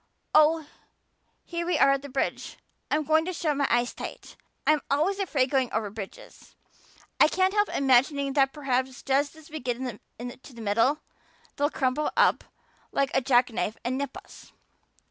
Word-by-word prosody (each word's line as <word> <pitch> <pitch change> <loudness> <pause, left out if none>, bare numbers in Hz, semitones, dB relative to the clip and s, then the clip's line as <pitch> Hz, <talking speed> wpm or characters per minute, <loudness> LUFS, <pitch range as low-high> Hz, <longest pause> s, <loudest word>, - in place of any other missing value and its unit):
Oh, 310 +1 +5 0.8
here 340 0 -4
we 355 +1 0
are 275 - +5
at 275 0 +1
the 285 - -9
bridge. 265 +1 -3 0.3
I'm 305 +1 +1
going 315 +1 +3
to 370 - -3
shut 310 -3 -1
my 280 -1 +1
eyes 240 +1 +1
tight. - - -8 0.3
I'm 305 -1 +3
always 325 +8 +1
afraid 280 -9 +1
going 260 -3 +1
over 215 -2 -2
bridges. 205 -2 -10 0.6
I - - +8
can't 375 +4 +1
help 415 0 +2
imagining 275 +1 +2
that 270 -1 +3
perhaps 260 -3 -2
just 280 +2 +1
as 315 0 -16
we 310 - -5
get 245 -2 -2
to 245 +2 -8
the - - -11
middle, 230 +8 +2 0.5
they'll 290 0 +1
crumple 270 +1 0
up - - +4 0.5
like 275 -1 0
a 265 - +3
jack 250 -1 +3
knife 215 -1 -2
and 250 +1 0
nip 275 0 -4
us. - - -14
275 Hz, 170 wpm, -27 LUFS, 255-305 Hz, 0.8 s, I